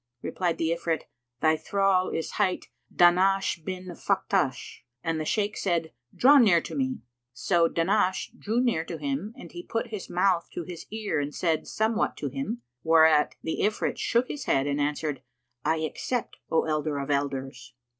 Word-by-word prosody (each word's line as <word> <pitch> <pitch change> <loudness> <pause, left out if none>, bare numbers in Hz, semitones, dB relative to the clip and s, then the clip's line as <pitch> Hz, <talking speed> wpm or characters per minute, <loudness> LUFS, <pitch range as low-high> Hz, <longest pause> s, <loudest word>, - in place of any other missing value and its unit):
Replied 175 -3 -1
the 165 0 0
Ifrit, 170 -1 -1 0.4
"Thy 160 0 +4
thrall 190 +3 +1
is 165 - -3
hight 185 -3 0 0.2
Dahnash 185 0 +3
bin 185 +1 -5
Faktash." 180 -6 -1 0.2
And 165 -1 -1
the 155 - -3
Shaykh 210 +4 0
said 170 -4 -1 0.2
"Draw 280 +3 +7
near 195 -9 +6
to - - -8
me!" 260 -2 -1 0.3
So 170 +6 +2
Dahnash 185 +3 +1
drew 220 +3 -1
near 235 -10 +1
to 165 0 -6
him 145 +7 -3
and - - -11
he 350 - -7
put 230 -9 -3
his 210 -4 -6
mouth 180 -1 +1
to 175 - -4
his 170 0 -9
ear 215 -6 -2
and 145 +1 -3
said 165 -3 0
somewhat 220 +1 0
to 145 - -3
him, 135 -3 -4 0.2
whereat 160 -2 +5
the 160 - -3
Ifrit 210 +1 0
shook 240 +1 +1
his 285 -2 -5
head 135 - +2
and 145 0 0
answered, 145 -1 -1 0.4
"I 160 +2 +2
accept, 225 - -3
O 160 - +2
elder 155 -1 -1
of 140 +1 -3
elders!" 135 -3 -3
170 Hz, 170 wpm, -27 LUFS, 155-200 Hz, 0.4 s, Draw